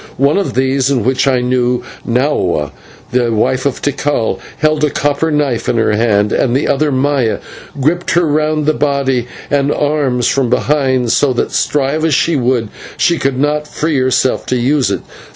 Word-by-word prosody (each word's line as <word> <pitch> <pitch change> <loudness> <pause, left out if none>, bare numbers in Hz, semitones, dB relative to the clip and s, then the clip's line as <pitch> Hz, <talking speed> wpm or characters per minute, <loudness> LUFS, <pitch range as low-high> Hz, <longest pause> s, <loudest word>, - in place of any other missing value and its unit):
One 140 +7 +2
of 195 - -3
these 130 +1 +1
in 130 -5 +1
whom 130 +4 +1
I 130 -2 +2
knew 125 0 0 0.2
Nahua, 115 - 0 0.4
the 120 -2 +1
wife 130 +5 +1
of 140 - -4
Tikal 145 -4 -1 0.2
held 155 0 +1
a 150 - +3
copper 145 +3 0
knife 145 -6 0
in 120 - +1
her 110 -1 +2
hand, 105 -1 +1
and 125 0 +1
the 140 - -1
other, 150 +1 +1
Maya, 135 -3 +1 0.4
gripped 160 +6 0
her 175 0 +3
round 155 0 0
the 155 - +2
body 140 -4 0 0.2
and 140 0 +2
arms 145 -5 0
from 135 -3 +1
behind, 130 -2 +1
so 140 -3 +2
that, 120 - -2
strive 145 +2 0
as 160 -4 +2
she 165 +3 +1
would, 125 -4 0 0.3
she 170 -1 +2
could 135 -1 -1
not 150 +2 0
free 150 -2 -1
herself 130 0 0
to 130 - 0
use 130 +3 +1
it. - - -2
135 Hz, 180 wpm, -14 LUFS, 125-150 Hz, 0.4 s, a